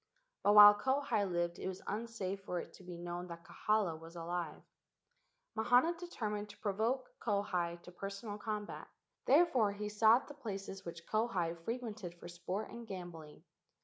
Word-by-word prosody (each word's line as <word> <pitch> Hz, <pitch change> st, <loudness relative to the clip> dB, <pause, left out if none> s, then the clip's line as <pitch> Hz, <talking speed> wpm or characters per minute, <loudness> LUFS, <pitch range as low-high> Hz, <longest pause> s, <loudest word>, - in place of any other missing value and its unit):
But 205 Hz, +1 st, +4 dB
while 205 Hz, 0 st, +12 dB
Kauhi 260 Hz, -4 st, +1 dB
lived 175 Hz, 0 st, -1 dB
it -, -, -3 dB
was 190 Hz, -1 st, -5 dB
unsafe 205 Hz, -3 st, -3 dB
for 180 Hz, -2 st, -2 dB
it -, -, -8 dB
to -, -, -14 dB
be 180 Hz, -1 st, -7 dB
known 175 Hz, +1 st, -5 dB
that 170 Hz, -1 st, -9 dB
Kahala 205 Hz, -7 st, 0 dB
was 165 Hz, +1 st, -12 dB
alive. 170 Hz, -2 st, -4 dB, 0.9 s
Mahana 245 Hz, +9 st, +4 dB
de¬ 345 Hz, +1 st, -9 dB
termined 210 Hz, -, -3 dB
to -, -, -12 dB
provoke 225 Hz, +6 st, -1 dB
Kauhi 180 Hz, -5 st, 0 dB
to -, -, -11 dB
personal 200 Hz, +3 st, -6 dB
combat; 210 Hz, -1 st, -4 dB, 0.4 s
therefore 265 Hz, -9 st, +5 dB
he 210 Hz, +1 st, -4 dB
sought 220 Hz, +3 st, +5 dB
the 290 Hz, -, -8 dB
places 195 Hz, -7 st, -6 dB
which 170 Hz, 0 st, -8 dB
Kauhi 195 Hz, -7 st, 0 dB
fre¬ 225 Hz, +9 st, -3 dB
quented 210 Hz, -7 st, -6 dB
for -, -, -9 dB
sport 180 Hz, +4 st, -4 dB
and 235 Hz, -1 st, -8 dB
gambling. 175 Hz, -6 st, -8 dB
200 Hz, 165 wpm, -35 LUFS, 175-220 Hz, 0.9 s, while